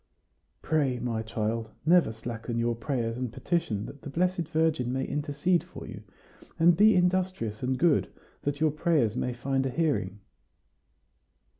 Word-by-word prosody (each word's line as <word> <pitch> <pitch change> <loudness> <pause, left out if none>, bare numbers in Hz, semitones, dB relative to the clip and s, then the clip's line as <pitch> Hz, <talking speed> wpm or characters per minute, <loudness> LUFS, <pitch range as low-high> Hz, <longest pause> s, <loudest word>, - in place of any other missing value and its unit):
"Pray, 140 -5 +1
my 115 -2 -2
child. 110 0 -2 0.2
Never 170 -7 +5
slacken 115 +1 -5
your 120 0 +1
prayers 115 -1 -2
and 125 -2 -3
petitions 110 - -1
that 140 - -10
the 145 - -7
Blessed 175 +2 0
Virgin 160 -6 +1
may 130 +1 -1
intercede 150 +4 0
for - - -10
you; - - -8 0.6
and 170 +1 +5
be 210 +3 +6
industrious 180 - 0
and 130 0 0
good, 165 0 +3 0.3
that 145 0 -2
your 155 -1 +3
prayers 150 -8 +1
may 125 - -1
find 135 +2 -1
a 135 - -1
hearing." 130 - -1
135 Hz, 150 wpm, -28 LUFS, 115-165 Hz, 0.6 s, be